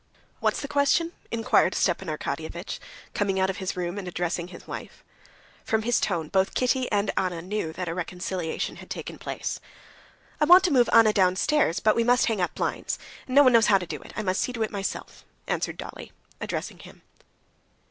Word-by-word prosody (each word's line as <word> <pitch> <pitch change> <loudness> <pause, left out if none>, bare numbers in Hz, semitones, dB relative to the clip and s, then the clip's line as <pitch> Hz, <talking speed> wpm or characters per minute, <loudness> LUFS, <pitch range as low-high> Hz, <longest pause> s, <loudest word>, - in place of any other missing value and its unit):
"What's - - +1
the 280 - -4
question?" 290 +4 +2 0.2
inquired 230 -1 +2
Stepan - - +1
Arkadyevitch, - - -4 0.3
coming 195 -2 0
out 190 0 +2
of 190 - -9
his 190 -1 -3
room 180 +2 -2
and 190 - -7
addressing 175 0 -2
his 180 -1 -12
wife. - - -8 0.6
From 220 0 0
his 240 +1 +2
tone 170 -5 -1
both 190 +3 +1
Kitty 255 0 +1
and 205 -1 +1
Anna 180 -2 0
knew 185 -3 -2
that 180 +1 -4
a 165 - -2
reconciliation 180 -1 -3
had - - -12
taken - - -6
place. - - -4 0.8
"I 300 - +4
want 355 +4 +8
to 360 - +2
move 245 -3 +4
Anna 225 -2 +6
downstairs, 190 - +2
but 215 - +3
we 230 - +3
must 245 +1 +4
hang 220 -5 0
up 180 - -1
blinds. - - -2 0.3
No 275 +3 +6
one 255 -2 +5
knows 230 -1 +6
how 200 - +6
to 185 - -4
do - - -6
it; - - -12
I 215 - -2
must 185 -1 0
see 250 - -1
to 230 -2 -1
it 215 - -3
myself," 195 -2 -5 0.2
answered - - -2
Dolly - - -8 0.3
addressing - - -4
him. - - -14
200 Hz, 195 wpm, -26 LUFS, 180-240 Hz, 0.8 s, want